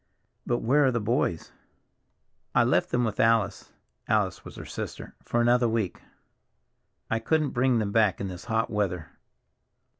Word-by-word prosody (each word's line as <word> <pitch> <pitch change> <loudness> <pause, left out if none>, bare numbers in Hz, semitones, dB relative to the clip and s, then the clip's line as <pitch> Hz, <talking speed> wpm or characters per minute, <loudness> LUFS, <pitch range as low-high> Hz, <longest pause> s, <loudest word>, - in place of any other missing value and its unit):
"But 120 0 0
where 145 +5 +4
are 130 - +3
the 120 - 0
boys?" 105 -7 -1 1.0
"I - - +6
left - - +2
them 125 - +1
with 110 -3 -2
Alice"—Alice 115 -2 0
was - - -11
her - - -8
sister—"for 120 - -5
another 120 0 +3
week. 110 -5 -2 1.1
I 115 - +1
couldn't 155 +5 +1
bring 125 0 +2
them 105 -2 -1
back 105 -4 +2
in 100 - -3
this 90 +1 -8
hot 115 -1 0
weather." 90 -6 -2
115 Hz, 145 wpm, -27 LUFS, 105-120 Hz, 1.1 s, I